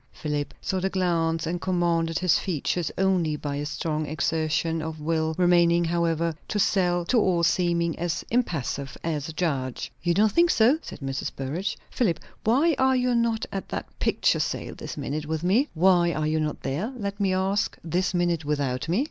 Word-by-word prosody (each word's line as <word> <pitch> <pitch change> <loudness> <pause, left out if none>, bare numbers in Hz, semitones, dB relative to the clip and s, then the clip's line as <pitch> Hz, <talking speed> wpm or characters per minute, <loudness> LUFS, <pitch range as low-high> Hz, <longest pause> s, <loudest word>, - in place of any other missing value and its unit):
Philip 150 -1 -3
saw 190 - -1
the 190 +1 0
glance 165 -4 0
and 170 +1 -3
commanded 170 -3 +1
his 180 -3 +3
features 175 -1 -1
only 185 -5 +2
by 145 -1 -4
a 145 +1 -3
strong 155 +1 -2
exertion 160 +2 0
of 160 0 -5
will, 160 +1 0
remaining, 175 -1 +4
however, 170 -1 0
to 185 -4 +1
all 185 -7 +3
seeming 170 -1 +1
as 170 -1 -2
impassive 145 - -1
as 160 -2 -2
a - - -6
judge. 140 -6 -2
"You 170 0 +1
don't 215 +1 +4
think 340 +9 +4
so?" 250 +6 +4
said - - -9
Mrs. 135 0 -3
Burrage. 165 +10 -3
"Philip, 185 -10 +1 0.2
why 275 +10 +3
are 265 0 +4
you 250 -1 +1
not 235 -1 +1
at 195 - -5
that - - -3
picture - - +2
sale - - -2
this - - -8
minute, 150 +2 -3
with 160 +1 -2
me?" 225 +11 +3
"Why 175 0 +4
are 155 0 -1
you 155 +1 +1
not 150 -1 -2
there, 175 - -2
let 200 -2 -4
me 195 -2 +2
ask, 190 +2 0
this 180 +3 0
minute 175 -2 +1
without 145 -1 -1
me?" 180 +6 +2
170 Hz, 180 wpm, -26 LUFS, 155-190 Hz, 0.2 s, remaining